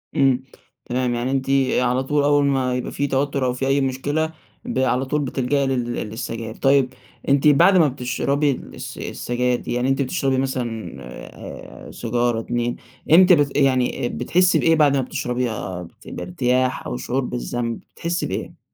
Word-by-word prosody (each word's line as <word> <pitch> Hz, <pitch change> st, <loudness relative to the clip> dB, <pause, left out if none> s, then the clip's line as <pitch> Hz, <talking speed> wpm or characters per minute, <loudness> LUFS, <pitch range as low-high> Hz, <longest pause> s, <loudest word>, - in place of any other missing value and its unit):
إمم، 135 Hz, -3 st, +3 dB, 0.4 s
تمام. 125 Hz, 0 st, -1 dB
يعني 125 Hz, +2 st, -1 dB
أنتِ 135 Hz, 0 st, -1 dB, 0.3 s
على 125 Hz, +1 st, +1 dB
طول 145 Hz, +1 st, +1 dB
أوّل 145 Hz, 0 st, +4 dB
ما 130 Hz, -2 st, +1 dB
يبقى 125 Hz, -, -3 dB
في 145 Hz, -, -1 dB
توتّر، 135 Hz, 0 st, 0 dB
أو 125 Hz, -, +1 dB
في 135 Hz, +1 st, -2 dB
أي 135 Hz, +1 st, +2 dB
مشكلة، 145 Hz, +5 st, -1 dB, 0.3 s
ب -, -, -2 dB
على 130 Hz, 0 st, +1 dB
طول 150 Hz, +3 st, 0 dB
بتلجئي 135 Hz, +1 st, 0 dB
لل 120 Hz, -2 st, -1 dB
للسجائر. 115 Hz, 0 st, -5 dB
طيّب، 135 Hz, -1 st, +3 dB, 0.4 s
أنتِ 140 Hz, +1 st, +4 dB
بعد 150 Hz, +7 st, +6 dB
ما 160 Hz, -4 st, +5 dB
بتشربي 140 Hz, +3 st, 0 dB
الس 130 Hz, -, -7 dB
السجاير 125 Hz, 0 st, -1 dB
دي، -, -, -5 dB
يعني 125 Hz, +2 st, 0 dB
أنتِ 135 Hz, +1 st, +1 dB
بتشربي 135 Hz, -2 st, 0 dB
مثلًا 125 Hz, -4 st, -3 dB, 0.9 s
آآ -, -, -10 dB
سيجارة، 120 Hz, 0 st, 0 dB
2، 120 Hz, +1 st, -2 dB, 0.4 s
إمتى 180 Hz, +2 st, +8 dB
بت 145 Hz, -3 st, +1 dB
يعني 130 Hz, -3 st, +2 dB
بتحسّي 180 Hz, +1 st, +2 dB
بإيه 165 Hz, -, +4 dB
بعد 145 Hz, -3 st, +4 dB
ما -, -, +2 dB
بتشربيها؟ 120 Hz, -8 st, -3 dB
بت 85 Hz, -, -16 dB
بارتياح، 125 Hz, +9 st, -1 dB
أو 60 Hz, -, -3 dB
شعور 125 Hz, -, -1 dB
بالذنب؟ 120 Hz, -2 st, -3 dB, 0.2 s
بتحسّي 170 Hz, +1 st, -2 dB
بإيه؟ -, -, -5 dB
130 Hz, 165 wpm, -22 LUFS, 120-140 Hz, 0.9 s, إمتى